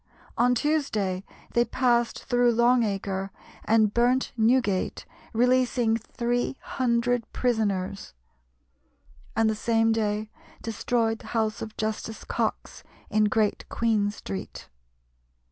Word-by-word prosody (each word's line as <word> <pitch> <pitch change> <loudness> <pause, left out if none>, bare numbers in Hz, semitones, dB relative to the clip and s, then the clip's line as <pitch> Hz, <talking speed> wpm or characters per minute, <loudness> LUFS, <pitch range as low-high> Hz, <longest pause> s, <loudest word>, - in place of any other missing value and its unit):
On 245 +1 +3
Tuesday 220 -10 0 0.3
they 235 - +4
passed 240 -2 +1
through 245 -1 +3
Long 240 +2 +4
Acre 195 -2 -2 0.4
and 215 -1 +3
burnt 245 +2 +2
Newgate, 225 -4 +1 0.3
releasing 245 -1 +2
three 240 +3 -2
hundred 245 -2 0
prisoners, 200 - -1 1.2
and 225 +1 +3
the 220 - +2
same 225 +1 +2
day 215 -1 -1 0.3
destroyed 225 0 0
the - - -12
house 220 -1 0
of 220 -1 -7
Justice 220 +1 -3
Cox - - -3 0.3
in 215 0 +3
Great 210 0 0
Queen 220 -3 +1
Street. 95 - -7
225 Hz, 110 wpm, -26 LUFS, 215-245 Hz, 1.2 s, they